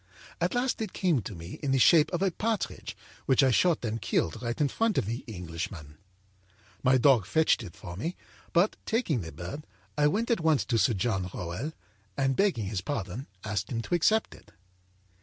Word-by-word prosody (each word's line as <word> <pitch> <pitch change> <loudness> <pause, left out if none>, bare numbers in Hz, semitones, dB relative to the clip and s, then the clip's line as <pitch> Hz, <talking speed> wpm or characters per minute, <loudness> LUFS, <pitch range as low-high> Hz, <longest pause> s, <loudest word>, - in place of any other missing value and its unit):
At - - +1
last 245 -1 0
it 220 - -3
came 170 -9 +1
to 100 - -7
me 85 +1 -8
in 145 - -2
the - - +4
shape 150 +4 +6
of 175 +1 0
a 195 - +2
partridge 220 +4 -3 0.3
which 130 +1 +5
I 130 - +4
shot 165 0 +2
and 115 0 -2
killed 85 +3 0
right 120 -1 -3
in 145 - +3
front 225 +7 0
of - - +2
the 115 +4 -3
Englishman. 85 -5 -6 0.8
My 130 0 +4
dog 125 -6 +4
fetched 160 +2 +3
it 100 -7 -9
for 85 - -8
me, 165 - -3 0.4
but, 180 +5 +3
taking 220 - +1
the 80 -2 -7
bird, 90 - -7 0.3
I 150 - +5
went 225 +10 0
at 230 - +2
once 160 -3 +2
to 115 -3 +1
Sir 115 +1 +3
John 95 -2 -1
Rowell 90 - -4 0.4
and, 135 -1 +2
begging 190 - +2
his 95 -1 -2
pardon, 110 0 -4 0.2
asked 105 -2 -3
him 115 -1 -2
to - - -4
accept 215 +6 +2
it. - - -17
130 Hz, 195 wpm, -29 LUFS, -, 0.8 s, shape